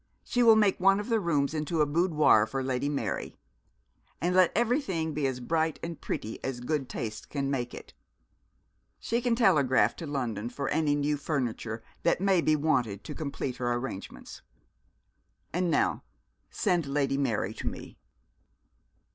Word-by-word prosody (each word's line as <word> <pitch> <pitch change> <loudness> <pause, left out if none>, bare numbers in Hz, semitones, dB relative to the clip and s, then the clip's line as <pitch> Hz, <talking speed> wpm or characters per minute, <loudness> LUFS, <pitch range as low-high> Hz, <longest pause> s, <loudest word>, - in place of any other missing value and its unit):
She 245 - 0
will 230 -2 +7
make 210 -3 +3
one 195 +2 +4
of 210 - -5
the 225 -1 +3
rooms 150 -6 0
into 155 +1 -2
a 150 - +5
boudoir 150 -8 +3
for 135 +2 -3
Lady 130 +2 -1
Mary; 145 - -3 0.8
and 175 +3 0
let 185 -2 +5
everything 220 - 0
be 145 -2 0
as 130 -1 -3
bright 160 +4 0
and 165 -1 -6
pretty 110 - -5
as 135 -2 -3
good 135 +1 -2
taste 110 -1 -5
can 140 -1 -2
make 125 -3 -2
it. - - -11 1.1
She 235 +2 -1
can 240 -1 +1
telegraph 155 - +3
to 165 - -6
London 120 -6 -3
for 140 +2 -4
any 150 -2 +2
new 145 +1 0
furniture 120 -6 -3 0.2
that - - +2
may 190 -2 +3
be 155 -1 +3
wanted 125 -10 0
to - - -6
complete 140 -4 -4
her 120 -1 -1
arrangements. 120 -5 -6 1.1
And 180 +1 +1
now - - +1 0.5
send 175 -8 0
Lady 140 -1 0
Mary 110 -6 0
to - - -6
me.' - - -7
145 Hz, 160 wpm, -29 LUFS, 130-175 Hz, 1.1 s, will